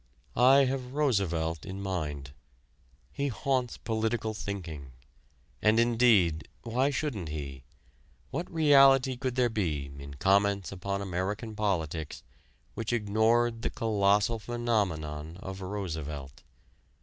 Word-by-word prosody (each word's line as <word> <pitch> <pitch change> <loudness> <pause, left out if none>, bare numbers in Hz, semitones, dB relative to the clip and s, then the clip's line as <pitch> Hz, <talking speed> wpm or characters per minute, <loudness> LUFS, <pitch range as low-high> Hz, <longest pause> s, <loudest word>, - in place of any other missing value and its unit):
I 135 +3 +6
have 130 -1 -3
Roosevelt 90 - 0
in 95 0 -6
mind. 75 -8 -4 0.8
He 140 - -2
haunts 130 -1 -1
political 110 0 -1
thinking. 85 - -6 0.7
And 110 +1 +4
indeed, 115 -9 +3 0.2
why 125 +4 +1
shouldn't 125 - -3
he? 70 -3 -6 0.7
What 175 - -4
reality 135 -5 +5
could 130 -1 -3
there 125 -1 +3
be 80 -11 -2
in 70 0 -9
comments 100 +3 +2
upon 100 +1 -3
American 100 +4 -3
politics 85 -7 -2 0.5
which 115 0 -3
ignored 115 +1 +2
the - - -1
colossal 105 0 +2
phenomenon 90 -10 -2
of 95 0 -7
Roosevelt? 80 -9 -5
100 Hz, 110 wpm, -29 LUFS, 85-120 Hz, 0.8 s, I